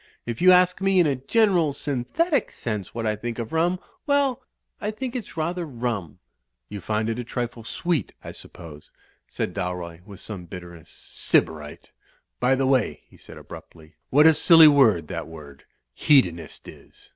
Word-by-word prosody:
If 120 -1 -5
you 185 +1 +7
ask 180 0 +4
me 195 -1 +3
in 175 - +5
a 145 -3 +1
general, 175 - +2
synthetic 150 - -1
sense 105 -5 -5
what 115 -1 -3
I 110 -1 0
think 115 +2 -6
of 115 -2 -5
rum 170 +3 +1
— 370 -4 -39
well, 285 -3 +1 0.4
I 210 - -2
think 245 +3 -5
it's 225 -9 -7
rather 170 +3 -2
rum." 120 - -4 0.5
"You 100 -1 -7
find 110 +3 -2
it 115 +1 -3
a - - -3
trifle 120 -1 -5
sweet, 170 +7 -2
I - - -7
suppose," 75 -3 -13 0.4
said - - -4
Dalroy, 90 -2 -5
with 100 -1 -13
some 95 -5 -7
bitterness. 85 -2 -11
"Sybarite! 75 -2 -2 0.5
By 125 +2 +3
the 135 0 0
way," 130 -3 +1
he - - -20
said - - -14
abruptly, 80 0 -13 0.2
"what 150 +3 +5
a 160 - +8
silly 165 +1 +7
word 115 - +4
that - - -5
word 75 -4 -13 0.3
'Hedonist' 85 - +1
is! - - -15
125 Hz, 170 wpm, -24 LUFS, -, 0.5 s, a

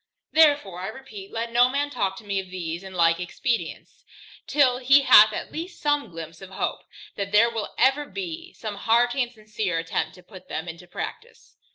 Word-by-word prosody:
Therefore 290 - +4
I 185 - -4
repeat, 215 -4 -9
let 230 +1 -3
no 245 +1 +5
man 285 +2 -1
talk 195 -6 -1
to - - -11
me 200 -1 -1
of 190 -1 -7
these 170 -2 -5
and 190 -1 -10
the - - -6
like 165 0 +4
expedients, 230 +7 -4 0.4
till 255 -4 +3
he 275 +2 +5
hath 215 -4 +8
at - - -5
least 345 +3 -7
some 290 -5 0
glympse 165 0 -9
of 190 - -10
hope, 190 - -3 0.3
that 200 -1 -4
there 225 +3 +5
will 225 -3 -5
ever 270 +3 +3
be 345 -1 -6
some 215 -2 -6
hearty 240 +5 +2
and 240 -1 -2
sincere 215 -5 -3
attempt 165 0 -2
to 180 - -16
put 185 -1 -14
them 160 +2 -4
into 170 +1 -9
practice. 460 - -8
215 Hz, 200 wpm, -25 LUFS, 185-265 Hz, 0.4 s, hath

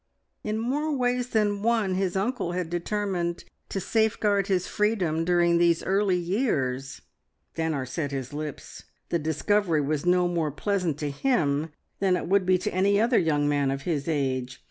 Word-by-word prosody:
In 215 0 -2
more 280 +7 -1
ways 250 0 0
than 205 -3 +1
one 220 -4 +1
his 185 -1 -1
uncle 200 -2 -1
had 175 -2 -3
determined 175 -1 -2 0.3
to 195 - -2
safeguard 205 -1 +1
his 185 -2 +1
freedom 185 -7 0
during 170 0 +3
these 170 -1 +3
early 195 -1 +2
years! 145 - -1 0.5
Stanor 160 -5 -1
set 150 +1 -3
his 135 -1 -5
lips. 150 -1 -7 0.2
The 170 - +1
discovery 160 +2 +1
was 145 +1 -1
no 180 0 +3
more 170 -3 0
pleasant 180 0 -1
to 145 -1 -1
him 155 - 0 0.3
than 190 -2 +2
it - - -4
would 190 0 +2
be 185 0 +5
to - - -3
any 200 +2 +3
other 235 +2 +3
young 150 -3 +1
man 145 -2 +1
of 135 +1 -3
his 150 -5 -2
age. 130 -5 -1
175 Hz, 165 wpm, -26 LUFS, 155-205 Hz, 0.5 s, be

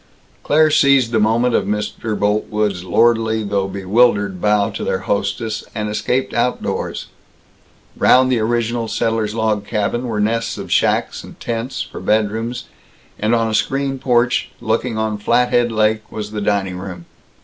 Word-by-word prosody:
Claire 155 +1 +3
seized 140 -5 +4
the 115 - +2
moment 115 +3 +2
of - - +2
Mr. 105 +1 -3
Boltwood's 105 -2 0
lordly 110 +3 +2
though 100 -1 -1
bewildered 100 0 +1
bow 105 0 +2
to - - -5
their 95 - -1
hostess, 100 +3 -2
and 105 -1 -2
escaped 125 +5 -1
outdoors. 125 +1 -2 0.9
Round 130 0 +4
the 125 - +2
original 115 +1 -1
settler's 110 -1 -1
log 110 -2 0
cabin 120 +3 -1
were 110 -3 -2
nests 115 +2 0
of - - -7
shacks - - +1
and - - -13
tents, 115 +2 -3
for - - -9
bedrooms, 110 +3 -1 0.6
and 110 +3 +2
on 115 -1 +1
a 110 - -3
screened 135 +3 -1
porch, 120 -1 +1
looking 115 0 -1
on 110 -1 -1
Flathead 120 +2 +2
Lake, 110 0 0
was 105 -1 -6
the 105 -1 -4
dining 95 -3 -1
room. 90 -3 -8
110 Hz, 150 wpm, -18 LUFS, 105-120 Hz, 0.9 s, seized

